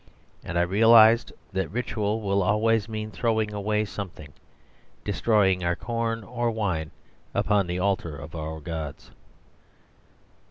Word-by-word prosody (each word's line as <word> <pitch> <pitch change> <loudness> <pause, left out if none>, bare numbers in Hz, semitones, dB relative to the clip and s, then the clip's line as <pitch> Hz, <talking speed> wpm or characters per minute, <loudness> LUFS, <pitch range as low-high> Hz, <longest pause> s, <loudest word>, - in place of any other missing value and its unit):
And 85 - -4
I 85 - +4
realised 110 +4 +6 0.2
that 95 0 -1
ritual 110 -2 -2
will 100 -1 +1
always 105 +3 +2
mean 110 0 -4
throwing 110 -2 0
away 105 +1 0
something; 90 -8 -8 0.7
DESTROYING 95 -5 +2
our 85 0 +1
corn 115 0 -2
or 120 +2 -2
wine 95 -9 -2 0.5
upon 100 -2 +2
the 90 +1 -2
altar 90 -5 -1
of 70 +2 -10
our 80 -1 -5
gods. 75 -3 -6
105 Hz, 125 wpm, -26 LUFS, 85-110 Hz, 0.7 s, realised